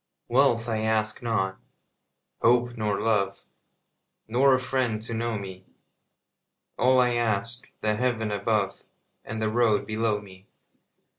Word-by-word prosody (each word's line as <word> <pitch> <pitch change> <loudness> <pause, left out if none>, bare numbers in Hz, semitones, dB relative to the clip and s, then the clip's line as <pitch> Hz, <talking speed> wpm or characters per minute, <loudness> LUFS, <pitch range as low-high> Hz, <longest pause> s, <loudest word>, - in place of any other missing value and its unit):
Wealth 120 -2 +3
I 110 -2 -1
ask 110 -1 0
not, 95 -5 -1 0.8
hope 120 +1 +3
nor 105 -3 -1
love, 100 -3 0 0.8
Nor 130 +4 +4
a - - 0
friend 130 -4 -1
to 115 - -6
know 115 -1 -1
me; 95 -2 -9 1.1
All 130 +1 +4
I 125 -1 +3
ask, 115 0 -1
the 110 0 +1
heaven 115 -3 0
above 100 -1 -1 0.4
And 110 +1 -5
the 110 - 0
road 115 -3 +2
below 110 0 0
me. 95 -1 -15
110 Hz, 130 wpm, -26 LUFS, 105-120 Hz, 1.1 s, Nor